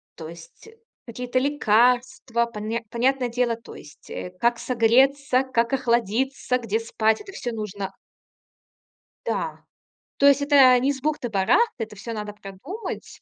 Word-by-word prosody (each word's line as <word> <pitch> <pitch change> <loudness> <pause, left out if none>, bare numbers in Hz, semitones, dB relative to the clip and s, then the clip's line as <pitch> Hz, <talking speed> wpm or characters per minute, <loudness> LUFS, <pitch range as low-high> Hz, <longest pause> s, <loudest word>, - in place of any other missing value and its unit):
то 160 -1 -8
есть 170 - -14 0.4
какие-то 250 +2 -2
лекарства. 250 -2 +2
Понят 225 +1 -4
понятное 250 +1 +1
дело, 240 0 0
то 230 - -13
есть, 150 - -15
э, 180 - -6
как 235 0 +2
согреться, 260 +3 +3
как 235 -1 0
охладиться, 250 +1 0
где 225 -3 -2
спать. 220 - 0
Это 405 -2 -11
всё 245 -10 -4
нужно 205 -3 -5 1.3
Да. - - -3 0.6
То 280 - +5
есть 280 0 +5
это 275 -3 +6
не 270 +3 +1
с 270 - -10
бухты-барахты. 265 - +1
Это 215 -1 -14
всё 230 +4 -7
надо 210 -1 -5
продумать. 210 - -8
240 Hz, 135 wpm, -24 LUFS, 220-265 Hz, 1.3 s, это